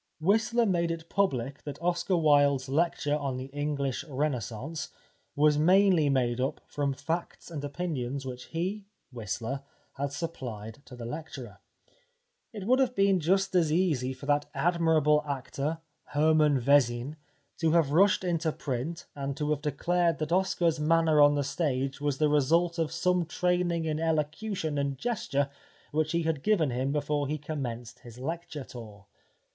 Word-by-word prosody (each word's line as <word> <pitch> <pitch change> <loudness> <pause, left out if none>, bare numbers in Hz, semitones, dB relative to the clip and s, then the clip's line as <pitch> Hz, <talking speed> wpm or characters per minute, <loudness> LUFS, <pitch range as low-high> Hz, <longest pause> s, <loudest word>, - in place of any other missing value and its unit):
Whistler 220 +7 +2
made 170 -4 +1
it 165 0 -5
public 140 -9 0
that 145 - -7
Oscar 175 +2 0
Wilde's 145 -4 +4
lecture 145 0 +1
on 140 -3 -2
the 130 +1 -7
English 145 -2 -2
Renaissance 140 - -3 0.5
was 150 0 +4
mainly 180 -2 +5
made 125 -2 +1
up 135 - -1
from 145 -1 -1
facts 165 +5 -4
and 150 -3 -5
opinions 140 -4 -3
which 125 -1 -6
he, 190 +5 -3 0.2
Whistler, 115 +3 -4 0.3
had 140 0 -3
supplied 125 -8 -6
to 125 - -11
the 120 -1 -7
lecturer. 155 +7 -7 0.9
It 210 -5 -7
would 255 +4 +4
have 255 -2 +2
been 195 -1 +3
just 190 +4 +1
as 170 -4 +3
easy 155 -7 +1
for 130 +1 -9
that 145 0 +1
admirable 155 -1 +3
actor, 140 +3 -3 0.3
Hermann 150 -1 +3
Vezin, 130 +1 +2 0.4
to 165 -1 +2
have 165 -5 +3
rushed 190 +5 +4
into 170 -2 0
print 145 +4 -4
and 140 -1 -4
to 150 0 -1
have 150 -1 0
declared 170 +3 +1
that 155 0 -3
Oscar's 175 -3 +2
manner 160 0 +4
on 145 0 +6
the 145 - +1
stage 135 -1 -2
was 145 -2 0
the 155 - +3
result 165 +4 +2
of 160 -2 0
some 180 -1 +1
training 175 -1 0
in 155 -1 -1
elocution 160 +1 -1
and 140 -1 -1
gesture 140 - -1 0.4
which 155 0 0
he 170 0 +1
had 160 -3 -1
given 175 -9 +2
him 130 +3 -1
before 145 0 0
he 150 +2 -2
commenced 125 -6 -5
his 120 -1 -13
lecture 155 +1 -5
tour. 105 -6 -11
150 Hz, 155 wpm, -29 LUFS, 135-170 Hz, 0.9 s, on